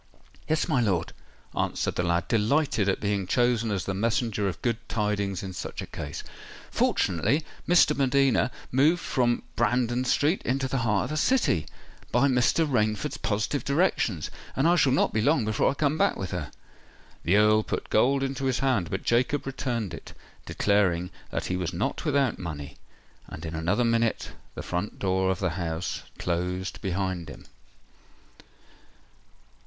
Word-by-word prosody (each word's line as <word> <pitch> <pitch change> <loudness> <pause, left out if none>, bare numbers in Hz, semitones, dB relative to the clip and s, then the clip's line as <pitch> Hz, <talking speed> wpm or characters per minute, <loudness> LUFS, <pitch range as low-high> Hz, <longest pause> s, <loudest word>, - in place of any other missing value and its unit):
"Yes, 155 0 +1
my 125 - +2
lord," 95 -7 0 0.4
answered - - -1
the - - -1
lad, 85 -1 0
delighted 115 -1 +2
at 95 - 0
being 100 -2 -1
chosen 120 -1 +2
as 100 -3 -2
the 95 - -2
messenger 110 0 0
of 90 - -4
good 120 -3 +1
tidings 100 -3 -1
in 95 -1 -5
such - - -6
a - - -3
case. 70 -1 -6 0.5
"Fortunately, 95 - +1 0.2
Miss 175 0 +6
de 150 - 0
Medina 135 -2 +2 0.2
moved 150 +7 +4
from 120 -2 +1
Brandon 120 +2 +1
Street 145 +7 +2
into 135 +2 -1
the 135 0 -1
heart 105 -5 +1
of - - -4
the 155 - -2
City, 150 - +2 0.4
by 125 +4 +4
Mr. 130 +5 +3
Rainford's 110 -6 0
positive 110 +5 -1
directions: 140 - +1 0.2
and 135 +4 +2
I 175 - +5
shall 145 -6 +4
not 135 - +2
be 110 - +1
long 135 -1 +3
before 110 +1 +2
I 140 - -2
come 150 +2 0
back - - +3
with - - -4
her." - - -4 0.7
The 90 - +3
Earl 105 +1 +5
put - - -4
gold 135 +5 +3
into 135 0 -2
his 130 -2 +1
hand; 125 -11 +1
but - - -3
Jacob 125 +4 +1
returned 120 -8 -3
it, - - -9 0.3
declaring 95 -3 +1 0.2
that - - -3
he 90 - -1
was 90 -1 -2
not 135 - -2
without 140 -5 +1
money; 75 -5 -6 0.5
and 80 - -8
in 80 - -5
another 85 +9 +1
minute 115 -1 +1 0.3
the - - -5
front 90 +4 -3
door 95 0 +1
of 95 - +1
the 90 -3 -1
house 80 +1 -3 0.2
closed 90 +2 -2
behind 95 -3 -2
him. - - -11
110 Hz, 165 wpm, -27 LUFS, 95-135 Hz, 0.7 s, Miss